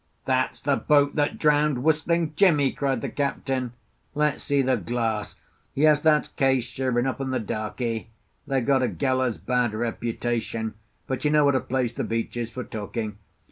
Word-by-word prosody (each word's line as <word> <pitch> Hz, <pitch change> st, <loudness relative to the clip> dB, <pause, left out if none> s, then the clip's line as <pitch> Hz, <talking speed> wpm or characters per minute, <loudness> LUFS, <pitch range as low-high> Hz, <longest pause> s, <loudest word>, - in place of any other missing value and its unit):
"That's 130 Hz, -1 st, 0 dB
the 140 Hz, -2 st, +1 dB
boat 145 Hz, -1 st, +3 dB
that 145 Hz, -1 st, 0 dB
drowned 150 Hz, -4 st, +2 dB
Whistling 160 Hz, +1 st, +1 dB
Jimmie!" 150 Hz, -7 st, +4 dB
cried 135 Hz, -4 st, -1 dB
the -, -, -3 dB
Captain; 135 Hz, -3 st, -2 dB, 0.4 s
"let's 150 Hz, 0 st, +1 dB
see 140 Hz, -1 st, +2 dB
the 130 Hz, 0 st, +2 dB
glass. 115 Hz, 0 st, -2 dB, 0.4 s
Yes, 150 Hz, +1 st, +4 dB
that's 155 Hz, -1 st, +3 dB
Case, 135 Hz, -2 st, +2 dB
sure 125 Hz, +1 st, -2 dB
enough, 130 Hz, +2 st, 0 dB
and 135 Hz, -1 st, -2 dB
the 130 Hz, -, 0 dB
darkie. 110 Hz, +1 st, -3 dB, 0.4 s
They've 135 Hz, -3 st, 0 dB
got 135 Hz, -2 st, +3 dB
a 125 Hz, -, +2 dB
gallows 130 Hz, -4 st, 0 dB
bad 125 Hz, -3 st, 0 dB
reputation, 115 Hz, -1 st, -2 dB, 0.3 s
but 130 Hz, -, -3 dB
you 150 Hz, -, +3 dB
know 150 Hz, -1 st, +4 dB
what 140 Hz, -, +4 dB
a 130 Hz, -, +3 dB
place 130 Hz, -1 st, -1 dB
the -, -, -3 dB
beach 115 Hz, +1 st, -2 dB
is 120 Hz, -1 st, -3 dB
for 125 Hz, -, -5 dB
talking. 105 Hz, -1 st, -5 dB
130 Hz, 175 wpm, -25 LUFS, 120-145 Hz, 0.4 s, Jimmie